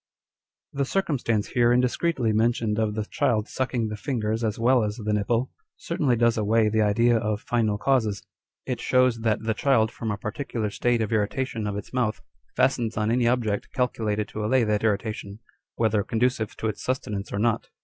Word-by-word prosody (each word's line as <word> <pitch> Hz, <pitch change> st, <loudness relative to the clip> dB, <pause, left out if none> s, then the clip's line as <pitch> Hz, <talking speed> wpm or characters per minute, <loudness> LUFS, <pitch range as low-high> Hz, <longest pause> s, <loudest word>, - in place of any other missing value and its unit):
The 140 Hz, -, 0 dB
circumstance 130 Hz, -, 0 dB
here 120 Hz, -1 st, +3 dB
indiscreetly 125 Hz, 0 st, +1 dB
mentioned 110 Hz, -1 st, +1 dB
of 105 Hz, -1 st, 0 dB
the 110 Hz, -1 st, -2 dB
child 120 Hz, -4 st, 0 dB
sucking 125 Hz, -3 st, -1 dB
the 105 Hz, -, -4 dB
fingers 110 Hz, -2 st, -2 dB
as 110 Hz, -2 st, -1 dB
well 120 Hz, +1 st, +3 dB
as 105 Hz, 0 st, -2 dB
the 105 Hz, -2 st, -2 dB
nipple, 115 Hz, +5 st, 0 dB, 0.3 s
certainly 150 Hz, -7 st, 0 dB
does 115 Hz, -1 st, +2 dB
away 110 Hz, +1 st, +3 dB
the 110 Hz, +1 st, +1 dB
idea 115 Hz, +3 st, +3 dB
of 105 Hz, -1 st, -1 dB
final 110 Hz, -4 st, 0 dB
causes. 110 Hz, -5 st, +1 dB, 0.4 s
It 125 Hz, -3 st, -3 dB
shows 125 Hz, -2 st, +3 dB
that 110 Hz, -1 st, 0 dB
the 110 Hz, 0 st, 0 dB
child, 110 Hz, -2 st, +2 dB
from 115 Hz, -, -5 dB
a 105 Hz, -, -1 dB
particular 110 Hz, -1 st, -4 dB
state 120 Hz, +1 st, +1 dB
of 110 Hz, -, -3 dB
irritation 110 Hz, +1 st, -1 dB
of 100 Hz, -1 st, -3 dB
its 105 Hz, -, -8 dB
mouth, 120 Hz, -4 st, 0 dB, 0.4 s
fastens 125 Hz, -4 st, +1 dB
on 105 Hz, +1 st, +1 dB
any 120 Hz, 0 st, +2 dB
object 115 Hz, -4 st, 0 dB
calculated 110 Hz, -4 st, -1 dB
to 105 Hz, -, -5 dB
allay 125 Hz, +3 st, +3 dB
that 105 Hz, -1 st, 0 dB
irritation, 105 Hz, -1 st, -2 dB, 0.4 s
whether 110 Hz, -3 st, +1 dB
conducive 115 Hz, 0 st, -1 dB
to 110 Hz, -, -2 dB
its 110 Hz, -, -4 dB
sustenance 105 Hz, -6 st, -3 dB
or -, -, -2 dB
not. 115 Hz, +1 st, 0 dB
115 Hz, 180 wpm, -25 LUFS, 105-125 Hz, 0.4 s, here